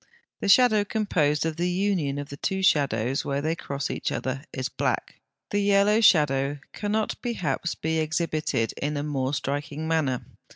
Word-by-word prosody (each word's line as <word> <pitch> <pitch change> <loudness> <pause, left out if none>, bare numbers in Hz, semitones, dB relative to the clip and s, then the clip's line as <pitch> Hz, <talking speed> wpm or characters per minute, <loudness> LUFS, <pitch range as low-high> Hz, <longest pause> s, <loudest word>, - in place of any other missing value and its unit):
The - - -2
shadow, 220 -2 +6
composed 165 -9 0
of 160 -1 -2
the 175 +1 0
union 180 -7 0
of 145 0 -5
the 140 - -8
two 190 +5 -2
shadows, 135 -6 +2
where 140 0 -1
they 160 +3 -1
cross 140 -4 -4
each - - -2
other, 130 +1 -3
is 130 -2 -3
black. - - -2 0.3
The 205 - +1
yellow 200 +2 +4
shadow 145 - +4
(74) 145 - -19
cannot 210 +1 -1
perhaps 175 - -2
be 160 0 -1
exhibited 155 -6 -1
in 145 +1 -1
a 145 - -2
more 140 -2 -1
striking 145 +3 -3
manner. 150 -6 0
155 Hz, 170 wpm, -26 LUFS, 140-190 Hz, 0.3 s, shadow